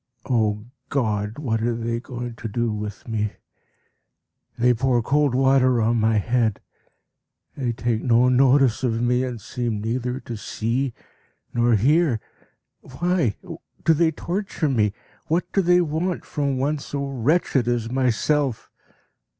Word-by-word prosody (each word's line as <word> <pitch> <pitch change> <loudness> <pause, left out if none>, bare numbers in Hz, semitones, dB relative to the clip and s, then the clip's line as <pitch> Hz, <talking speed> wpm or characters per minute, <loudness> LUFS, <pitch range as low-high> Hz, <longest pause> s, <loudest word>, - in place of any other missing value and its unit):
O 110 -4 +1 0.2
God! 110 -5 -1
what 115 -7 -1
are 120 +1 0
they 115 0 -2
going 120 -1 -6
to 115 - -5
do 120 +2 -1
with 105 +1 -6
me? 105 -2 -1 1.2
They 125 +1 +4
pour 120 0 +1
cold 145 0 +2
water 130 -2 +4
on 115 +1 +2
my 110 0 +2
head. 115 0 +1 1.0
They 125 -4 -1
take 115 -1 -1
no 120 0 +4
notice 130 -1 +4
of 115 -3 0
me, 125 +1 +2
and 125 -3 -4
seem 120 -1 -3
neither 125 +3 -2
to 120 - -6
see 115 +4 -2 0.6
nor 120 -1 +3
hear. 140 - +3 0.6
Why 170 - -1 0.5
do 165 - +6
they 165 +1 +3
torture 170 0 -2
me? 110 -6 +2 0.4
What 165 +3 0
do 195 - +3
they 180 0 +4
want 170 +2 -2
from 140 -2 -1
one 145 +3 0
so 140 0 -4
wretched 135 0 +1
as 120 -1 -1
myself? 130 0 0
125 Hz, 140 wpm, -23 LUFS, 115-140 Hz, 1.2 s, do